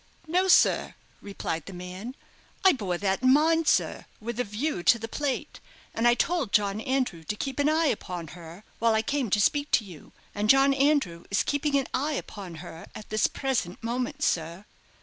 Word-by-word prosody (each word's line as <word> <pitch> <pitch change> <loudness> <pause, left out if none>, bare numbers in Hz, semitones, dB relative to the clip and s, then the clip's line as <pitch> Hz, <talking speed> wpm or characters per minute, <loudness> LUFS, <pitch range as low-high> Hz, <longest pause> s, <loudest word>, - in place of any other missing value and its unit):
"No, 360 +4 +1
sir," 365 - +4 0.3
replied 165 -5 -5
the 195 - -8
man. 180 +7 -7 0.5
"I 380 - +9
bore 195 -9 -2
that 195 +2 -1
in 255 0 +5
mind, 320 +3 +3
sir, - - +1
with 235 +2 -5
a - - +2
view 220 - -3
to 235 - +5
the 225 0 -6
plate, 280 +2 -3 0.3
and 230 +1 +2
I 240 - +5
told 295 - 0
John 205 0 +2
Andrew 255 -10 -1
to 210 - -3
keep 270 +5 -4
an 285 +1 +3
eye 320 +1 +2
upon 180 - -3
her 170 +3 -11 0.2
while 230 -1 +3
I 220 - +1
came 275 -1 -1
to 205 - +2
speak 285 +7 +2
to 220 - +4
you; 175 -6 -13 0.2
and 210 +1 -2
John 270 +2 +6
Andrew 275 - +1
is 200 - +2
keeping 285 0 0
an 270 - 0
eye 290 +4 0
upon 195 -10 -6
her 165 +1 -10
at 215 - -10
this 215 - +3
present 245 -9 -3
moment, 240 +2 -3
sir." 170 +4 -1
230 Hz, 195 wpm, -27 LUFS, 195-280 Hz, 0.5 s, I